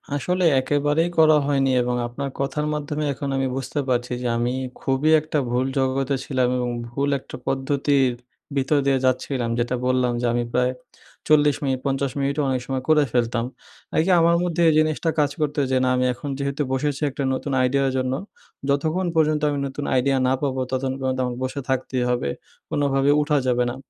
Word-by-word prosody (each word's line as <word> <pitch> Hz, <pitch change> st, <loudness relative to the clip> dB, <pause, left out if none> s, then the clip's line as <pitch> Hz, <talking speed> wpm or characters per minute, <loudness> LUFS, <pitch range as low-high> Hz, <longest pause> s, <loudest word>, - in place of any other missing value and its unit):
আসলে 180 Hz, +6 st, -1 dB, 0.2 s
একেবারেই 145 Hz, +5 st, +1 dB
করা 155 Hz, -1 st, +6 dB
হয়নি 135 Hz, -2 st, +2 dB
এবং 125 Hz, 0 st, -1 dB
আপনার 140 Hz, +3 st, -5 dB
কথার 145 Hz, +2 st, -1 dB
মাধ্যমে 150 Hz, 0 st, -3 dB
এখন 140 Hz, +1 st, -5 dB
আমি 135 Hz, 0 st, +1 dB
বুঝতে 135 Hz, +2 st, -3 dB
পারছি 125 Hz, 0 st, 0 dB
যে, 125 Hz, -, -1 dB
আমি 120 Hz, +1 st, 0 dB, 0.3 s
খুবই 135 Hz, +3 st, +1 dB
একটা 155 Hz, 0 st, -3 dB
ভুল 125 Hz, +1 st, +1 dB
জগতে 135 Hz, +1 st, +1 dB
ছিলাম 130 Hz, -3 st, +1 dB
এবং 125 Hz, -1 st, -1 dB, 0.2 s
ভুল 140 Hz, +4 st, -1 dB
একটা -, -, -11 dB
পদ্ধতির 135 Hz, 0 st, +1 dB, 0.4 s
ভিতর 135 Hz, +2 st, +2 dB
দিয়ে 135 Hz, -1 st, +3 dB
যাচ্ছিলাম। 130 Hz, -1 st, 0 dB
যেটা 120 Hz, +1 st, 0 dB
বললাম 125 Hz, -1 st, +2 dB
যে -, -, 0 dB
আমি 120 Hz, 0 st, 0 dB
প্রায় 125 Hz, +1 st, +2 dB, 0.6 s
৪০ 150 Hz, -2 st, +4 dB
মিনিট, 135 Hz, -2 st, 0 dB
৫০ 135 Hz, -1 st, 0 dB
মিনিটও 140 Hz, +2 st, 0 dB
অনেক 130 Hz, -1 st, 0 dB
সময় 130 Hz, -1 st, -3 dB
করে 155 Hz, -1 st, +5 dB
ফেলতাম। 120 Hz, -1 st, 0 dB, 0.5 s
এই 160 Hz, -, +4 dB
যে -, -, +4 dB
আমার 170 Hz, +1 st, +4 dB
মধ্যে 175 Hz, -1 st, -1 dB
এই -, -, +3 dB
জিনিসটা 155 Hz, +1 st, +1 dB
কাজ 145 Hz, -1 st, +2 dB
করতো 150 Hz, -1 st, -1 dB
যে 130 Hz, -, +3 dB
না 130 Hz, -, +2 dB
আমি 125 Hz, 0 st, +1 dB
এখন 140 Hz, +4 st, -7 dB
যেহেতু 140 Hz, +1 st, -2 dB
বসেছি 145 Hz, +2 st, -1 dB
একটা 140 Hz, +1 st, -4 dB
নতুন 140 Hz, +2 st, -3 dB
আইডিয়ার 135 Hz, +1 st, +2 dB
জন্য, 130 Hz, 0 st, 0 dB, 0.6 s
যতক্ষণ 160 Hz, +6 st, +1 dB
পর্যন্ত 155 Hz, -1 st, +2 dB
আমি 145 Hz, -, -2 dB
নতুন 140 Hz, +2 st, -5 dB
আইডিয়া 135 Hz, +1 st, +2 dB
না 130 Hz, -, +3 dB
পাবো 130 Hz, -2 st, -1 dB
ততক্ষণ 130 Hz, 0 st, -1 dB
পর্যন্ত 130 Hz, -1 st, -1 dB
আমাকে 125 Hz, -1 st, -4 dB
বসে 135 Hz, +2 st, -3 dB
থাকতেই 130 Hz, -1 st, -1 dB
হবে, 120 Hz, -12 st, 0 dB, 0.4 s
কোনোভাবে 140 Hz, -1 st, +1 dB
উঠা 150 Hz, 0 st, +1 dB
যাবে 125 Hz, 0 st, +2 dB
না। 120 Hz, -, -5 dB
135 Hz, 185 wpm, -23 LUFS, 130-145 Hz, 0.6 s, করা